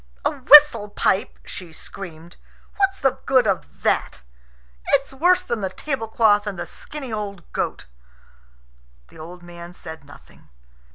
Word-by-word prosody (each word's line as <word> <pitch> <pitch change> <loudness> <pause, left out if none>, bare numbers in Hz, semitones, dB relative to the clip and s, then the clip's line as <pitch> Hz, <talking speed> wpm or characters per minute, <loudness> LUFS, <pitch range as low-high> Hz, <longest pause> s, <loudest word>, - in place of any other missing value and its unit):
"A - - +3
whistle 280 -6 +7
pipe!" 195 -1 0
she 180 -3 -9
screamed. 170 0 -11 0.4
"What's 390 -1 +1
the 270 -2 0
good 260 -3 +4
of 175 - -3
that? - - 0 0.7
It's 275 -1 +1
worse 355 +6 +3
than 235 -10 -3
the 190 - -2
tablecloth 220 -4 0
and 200 -3 -4
the 175 - -4
skinny 275 -6 -9
old 200 -4 -5
goat." 65 - -3 1.2
The - - -16
old 175 +3 -10
man 175 0 -11
said 160 -3 -10
nothing. 145 - -18
205 Hz, 135 wpm, -22 LUFS, 175-270 Hz, 1.2 s, whistle